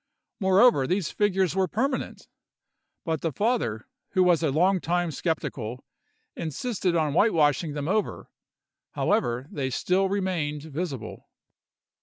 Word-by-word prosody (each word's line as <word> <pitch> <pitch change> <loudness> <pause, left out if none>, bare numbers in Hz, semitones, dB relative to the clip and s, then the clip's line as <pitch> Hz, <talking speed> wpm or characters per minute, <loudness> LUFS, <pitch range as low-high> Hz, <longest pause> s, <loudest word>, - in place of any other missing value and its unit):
Moreover, 190 - +4
these 185 -1 0
figures 190 -3 +1
were 190 -1 +2
permanent; 255 - -2 0.8
but 160 -3 -1
the 165 - -1
father, 200 - -1 0.3
who 185 -2 +4
was 175 -3 +4
a 160 - +1
long 180 +7 +3
time 175 0 0
skeptical, 130 -7 -3 0.5
insisted 180 - -2
on 155 -3 +1
whitewashing 155 - +3
them 145 0 -4
over; 210 +3 -2 0.6
however, 120 +3 0
they 135 -3 -2
still 185 +9 +1
remained 175 -7 -2
visible. 155 -4 -6
170 Hz, 120 wpm, -26 LUFS, 145-190 Hz, 0.8 s, Moreover